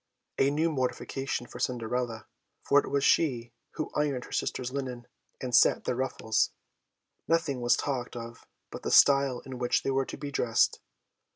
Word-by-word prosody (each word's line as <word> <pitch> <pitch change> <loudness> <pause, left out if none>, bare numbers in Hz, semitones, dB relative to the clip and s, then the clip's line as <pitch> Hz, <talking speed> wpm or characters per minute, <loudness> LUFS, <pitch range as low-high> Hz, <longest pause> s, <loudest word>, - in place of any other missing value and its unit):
A 135 - +4
new 155 +3 +1
mortification 135 -1 -2
for 120 - -11
Cinderella, 120 -2 -2 0.4
for 145 - +5
it - - -4
was 140 0 0
she 120 -9 +2 0.2
who 155 - -4
ironed 145 -4 -1
her - - -15
sisters' 125 -1 -2
linen, 130 -3 -5 0.3
and 125 -1 -5
set - - +5
their - - -1
ruffles. 120 -4 0 0.8
Nothing 165 -6 +1
was 120 0 +3
talked 130 -4 -3
of 115 0 -9 0.2
but - - -7
the - - -3
style 140 -3 +5
in 130 -2 -8
which 125 0 +1
they - - 0
were 135 0 +1
to - - -7
be 145 0 -6
dressed. 120 -4 +2
130 Hz, 170 wpm, -29 LUFS, 120-140 Hz, 0.8 s, for